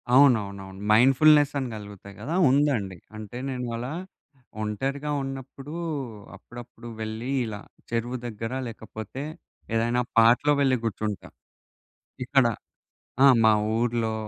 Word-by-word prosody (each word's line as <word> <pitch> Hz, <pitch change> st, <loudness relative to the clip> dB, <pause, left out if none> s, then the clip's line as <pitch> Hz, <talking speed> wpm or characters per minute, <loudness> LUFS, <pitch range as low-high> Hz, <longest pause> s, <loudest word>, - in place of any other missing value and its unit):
అవునవునవును. 100 Hz, -8 st, +3 dB
మైండ్‌ఫుల్‌నెసని 140 Hz, +3 st, +5 dB
కలుగుతాయి 100 Hz, -1 st, -10 dB
కదా 155 Hz, +9 st, -3 dB
ఉందండి. 130 Hz, -9 st, +1 dB, 0.2 s
అంటే 110 Hz, +2 st, -8 dB
నేను 125 Hz, -2 st, -3 dB
అలా 125 Hz, +5 st, -4 dB, 0.7 s
ఒంటరిగా 135 Hz, +8 st, -2 dB
ఉన్నప్పుడు 135 Hz, +2 st, -7 dB, 0.6 s
అప్పుడప్పుడు 120 Hz, 0 st, -12 dB
వెళ్ళి 110 Hz, +4 st, -4 dB
ఇలా 105 Hz, -2 st, -5 dB, 0.3 s
చెరువు 120 Hz, +2 st, -2 dB
దగ్గర 115 Hz, 0 st, -5 dB, 0.2 s
లేకపోతే 110 Hz, +3 st, -7 dB, 0.5 s
ఏదైనా 120 Hz, +2 st, +1 dB, 0.2 s
పార్క్‌లో 120 Hz, +6 st, +5 dB
వెళ్ళి 135 Hz, -2 st, +3 dB
కూర్చుంటా, 110 Hz, -2 st, -3 dB, 1.0 s
ఇక్కడ. 135 Hz, 0 st, +4 dB, 0.8 s
ఆ! -, -, +9 dB, 0.2 s
మా 110 Hz, -, +7 dB, 0.2 s
ఊరి‌లో 115 Hz, -1 st, 0 dB
120 Hz, 100 wpm, -26 LUFS, 110-135 Hz, 1.0 s, ఆ